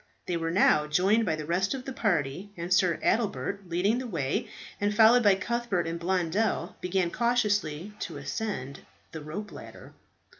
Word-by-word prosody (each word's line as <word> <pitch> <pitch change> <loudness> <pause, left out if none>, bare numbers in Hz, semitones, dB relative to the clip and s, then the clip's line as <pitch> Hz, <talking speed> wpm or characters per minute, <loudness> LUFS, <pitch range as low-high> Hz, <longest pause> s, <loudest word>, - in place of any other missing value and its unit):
They 180 - -2
were 165 -1 -1
now 160 -4 +4
joined 195 +9 +2
by 160 - +1
the 155 -1 -6
rest 185 - 0
of 260 -1 -7
the 265 - -5
party, 180 - -1
and 170 +2 -1
Sir 185 -3 +3
Adelbert 200 -3 -1
leading 195 +8 +1
the 255 - -5
way, 175 - -2 0.3
and 205 +1 +1
followed 230 +3 +7
by 205 -4 +5
Cuthbert 220 -3 -1
and 165 +1 -3
Blondel, 185 +4 0
began 180 -1 0
cautiously 210 -7 0
to - - -5
ascend 140 -12 -4 0.3
the 160 - -7
rope 170 +8 -6
ladder. - - -11
190 Hz, 165 wpm, -28 LUFS, 170-215 Hz, 0.3 s, followed